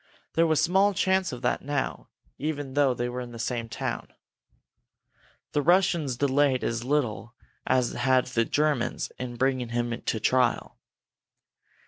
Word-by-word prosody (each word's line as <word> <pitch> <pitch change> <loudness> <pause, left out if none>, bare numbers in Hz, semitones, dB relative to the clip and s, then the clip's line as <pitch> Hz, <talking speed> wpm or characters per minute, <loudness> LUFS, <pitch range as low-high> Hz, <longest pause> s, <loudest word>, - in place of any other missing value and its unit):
There 165 0 +3
was 155 -2 +2
small 190 +5 +3
chance 190 0 +1
of 125 -1 -8
that 125 - +1
now, 145 -1 -3 0.3
even 145 -2 -3
though 140 -3 +3
they 120 +1 -2
were 125 +1 -4
in 120 -1 -8
the - - -8
same 115 0 -3
town. - - -4 1.4
The 145 - +1
Russians 170 -6 +2
delayed 140 -1 +2
as 115 0 -1
little 125 -4 -1 0.3
as 125 -2 +2
had 130 +1 +2
the 120 -2 +1
Germans 145 -5 0
in 125 -1 -5
bringing 130 -1 0
him 120 0 -2
to 110 - -2
trial. 130 +4 +1
130 Hz, 145 wpm, -27 LUFS, 120-150 Hz, 1.4 s, There